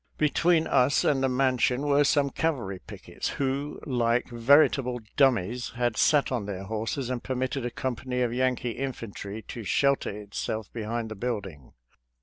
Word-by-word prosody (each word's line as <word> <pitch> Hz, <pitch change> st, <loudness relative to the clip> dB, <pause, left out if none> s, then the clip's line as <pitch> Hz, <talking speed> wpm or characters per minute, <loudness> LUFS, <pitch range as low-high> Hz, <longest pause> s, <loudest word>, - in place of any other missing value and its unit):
Between 160 Hz, +2 st, +3 dB
us 125 Hz, +3 st, +3 dB
and 140 Hz, -3 st, +2 dB
the 135 Hz, -, +2 dB
mansion 130 Hz, 0 st, +1 dB
were 145 Hz, 0 st, +4 dB
some 140 Hz, -1 st, +2 dB
cavalry 120 Hz, -, -2 dB
pickets, -, -, -7 dB
who, 140 Hz, +2 st, -2 dB
like 120 Hz, -2 st, +1 dB
veritable 125 Hz, +1 st, +3 dB, 0.2 s
dummies, 125 Hz, -3 st, +2 dB
had 120 Hz, -2 st, 0 dB
sat 145 Hz, +2 st, +3 dB
on 115 Hz, -6 st, -2 dB
their 95 Hz, -1 st, -5 dB
horses 115 Hz, +5 st, -3 dB
and 125 Hz, -2 st, -3 dB
permitted 130 Hz, 0 st, -2 dB
a -, -, -3 dB
company 125 Hz, 0 st, -3 dB
of 120 Hz, -2 st, 0 dB
Yankee 125 Hz, -1 st, 0 dB
infantry 115 Hz, -5 st, -6 dB
to 115 Hz, -, -7 dB
shelter 140 Hz, +7 st, +2 dB
itself 105 Hz, +1 st, -5 dB
behind 115 Hz, 0 st, -3 dB
the 110 Hz, -, -6 dB
building. 100 Hz, -, -5 dB
125 Hz, 150 wpm, -27 LUFS, 110-135 Hz, 0.2 s, were